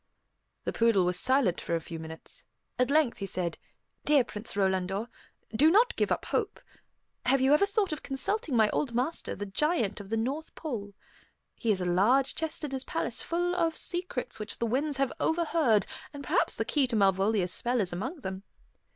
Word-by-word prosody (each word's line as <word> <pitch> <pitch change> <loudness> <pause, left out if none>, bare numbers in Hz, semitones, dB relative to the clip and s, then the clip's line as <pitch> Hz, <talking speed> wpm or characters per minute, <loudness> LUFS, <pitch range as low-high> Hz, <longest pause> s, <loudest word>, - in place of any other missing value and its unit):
The - - -2
poodle 225 -5 +3
was 180 0 +4
silent 255 -9 +3
for 170 - -1
a - - 0
few 165 0 -8
minutes. 160 0 -8 0.4
At 250 - +3
length 295 -4 +2
he 195 - -3
said, 175 -3 -2 0.4
"Dear 290 -3 +5
Prince 210 -2 -6
Rolandor, 195 +2 0 0.5
do 300 +7 +6
not 465 +7 +4
give - - 0
up - - 0
hope. 425 -2 -1 0.7
Have 270 +2 +4
you 265 +2 +4
ever 350 +7 +4
thought 400 -4 0
of 305 - -5
consulting 275 - -1
my 220 -2 +5
old 245 -6 -1
master, 260 +7 -1
the 205 - -5
Giant 220 - 0
of 200 -1 -9
the 225 - 0
North 275 +8 -3
Pole? 210 -10 -5 0.6
He 230 - -3
has 195 -3 +2
a - - -1
large 215 +10 +3
chest 320 0 -3
in 295 - -3
his 265 -1 -2
palace - - -2
full 350 +1 -1
of 330 -2 +1
secrets 345 -10 -3
which 215 0 -4
the 235 - -1
winds 275 +5 0
have 270 -1 0
overheard, 320 - +2 0.3
and 285 -1 -7
perhaps - - +1
the - - -1
key 285 -3 +2
to 240 - -2
Malvolia's 195 -1 +2
spell 245 +1 0
is 185 -4 -1
among 260 - -4
them. 190 -3 -5
245 Hz, 195 wpm, -29 LUFS, 200-300 Hz, 0.7 s, do